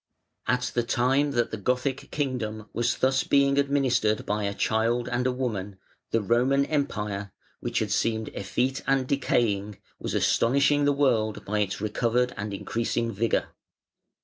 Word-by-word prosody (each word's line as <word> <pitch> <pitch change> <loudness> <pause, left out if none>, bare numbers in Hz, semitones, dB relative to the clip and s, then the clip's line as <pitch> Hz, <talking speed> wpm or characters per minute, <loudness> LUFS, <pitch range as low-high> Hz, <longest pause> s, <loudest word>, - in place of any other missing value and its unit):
At 125 -1 0
the 120 - +2
time 130 +4 +2
that 120 -2 +1
the 110 - -3
Gothic 125 +5 -1
kingdom 115 -7 -3
was 120 +1 0
thus 130 +1 +2
being 140 0 +3
administered 130 -6 +1
by 105 0 -1
a 100 - -1
child 115 +2 +1
and 125 +1 0
a - - +2
woman, 105 -7 -3 0.3
the 115 - +1
Roman 125 +6 +3
Empire, 105 -10 -2 0.3
which - - -3
had - - 0
seemed 110 -1 0
effete 125 +6 -1
and 135 -1 +2
decaying, 105 -7 0 0.2
was - - -3
astonishing 140 +4 +3
the 145 - +4
world 120 -7 +1
by 105 +1 -1
its 100 -2 -1
recovered 120 +4 0
and 105 +1 -4
increasing 115 +3 -2
vigour. 115 +3 0
120 Hz, 150 wpm, -26 LUFS, 110-135 Hz, 0.3 s, the